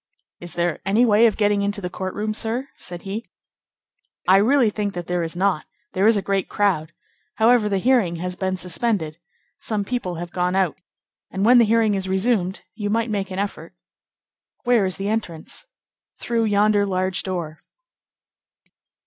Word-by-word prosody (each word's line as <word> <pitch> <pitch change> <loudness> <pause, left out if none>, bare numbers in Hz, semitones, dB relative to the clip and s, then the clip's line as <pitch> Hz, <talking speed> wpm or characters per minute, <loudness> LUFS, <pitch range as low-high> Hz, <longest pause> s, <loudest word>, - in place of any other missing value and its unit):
"Is 175 0 -8
there 175 -1 0
any 210 +5 +3
way 225 +1 +5
of 220 - -1
getting 205 -1 +2
into 205 0 -1
the 180 - -4
court 185 +1 -5
room, 215 +1 -2
sir?" 230 +5 -2
said 175 -1 -6
he. 200 +1 -5 1.0
"I 190 - +7
really 235 +2 +4
think 205 -2 -3
that 175 -1 -4
there 180 0 -1
is 165 +1 -4
not. 185 -3 0 0.3
There 190 +2 +3
is 225 -1 +5
a 200 - -2
great 195 -1 -1
crowd. 175 -6 0 0.4
However, 225 0 +4
the 200 - +1
hearing 215 -5 +2
has 180 +2 -4
been 190 0 -2
suspended. 180 -3 -2 0.4
Some 210 -2 -2
people 195 -7 -3
have 175 +1 -6
gone 180 0 0
out, 190 -5 +1 0.5
and 195 +1 -1
when 245 +2 +7
the 235 - +6
hearing 220 -1 +3
is 190 -1 -2
resumed, 190 -1 0
you 210 -1 -3
might 225 +1 0
make 200 -2 -2
an 185 - -6
effort." 190 -4 -4 0.9
"Where 240 -5 +3
is 185 - -3
the 195 - -3
entrance?" 210 - -4 0.5
"Through 230 -1 0
yonder 205 0 +3
large 185 -1 0
door." 170 -5 -4
200 Hz, 175 wpm, -22 LUFS, 180-220 Hz, 1.0 s, I